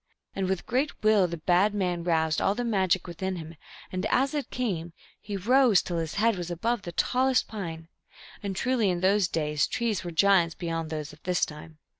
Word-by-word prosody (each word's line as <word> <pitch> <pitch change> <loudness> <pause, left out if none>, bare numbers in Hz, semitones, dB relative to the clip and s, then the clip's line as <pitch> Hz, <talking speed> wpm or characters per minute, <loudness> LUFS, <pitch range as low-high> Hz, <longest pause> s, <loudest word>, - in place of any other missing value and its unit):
And 190 -1 -1
with 190 -1 -2
great 260 +2 -1
will 215 -4 +5
the 170 0 -5
bad 180 +6 +2
man 180 -4 -1
roused 160 -2 +1
all 195 - +2
the 245 - -2
magic 190 -5 +1
within 185 +2 -4
him, 165 -1 -8 0.4
and 185 0 -3
as 270 +5 +1
it 290 -2 -3
came, 175 -9 -3 0.3
he 205 -1 -5
rose 240 +1 +4
till 175 -2 -3
his 160 -1 -4
head 220 0 +2
was 175 -1 -5
above 225 +7 -1
the 175 - -7
tallest 255 +8 +2
pine; 165 -6 -6 0.5
and 200 -2 -4
truly 240 -1 +1
in 175 -1 -1
those 195 0 +3
days 150 -3 0
trees 230 -5 -1
were 175 - -4
giants 170 -1 +3
beyond 165 -2 -3
those 150 -2 -5
of 150 - -17
this 180 -1 +1
time. 155 +1 -11
185 Hz, 200 wpm, -27 LUFS, 165-215 Hz, 0.5 s, will